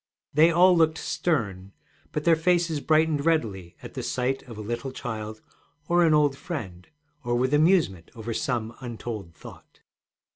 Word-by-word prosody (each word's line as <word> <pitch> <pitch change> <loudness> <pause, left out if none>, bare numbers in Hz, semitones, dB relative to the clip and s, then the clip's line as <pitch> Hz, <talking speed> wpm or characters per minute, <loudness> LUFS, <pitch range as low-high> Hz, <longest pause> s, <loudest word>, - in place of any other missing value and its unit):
They 155 +3 +6
all 180 +2 +5
looked 160 -1 +3
stern, 100 - -2 0.4
but 150 - -3
their 170 0 +5
faces 170 -1 +1
brightened 155 -1 +2
readily 105 - -1
at - - -6
sight 130 +1 -1
of 115 - -9
a - - -6
little 120 +5 -4
child 110 -4 -6 0.5
or 175 0 +4
an 160 -2 +4
old 145 -2 +3
friend, 95 - -7 0.4
or 120 0 0
with 130 +3 +1
amusement 150 - +2
over 115 0 -5
some 115 -1 -2
untold 115 -8 -7
thought. - - -14
135 Hz, 150 wpm, -26 LUFS, 110-160 Hz, 0.5 s, They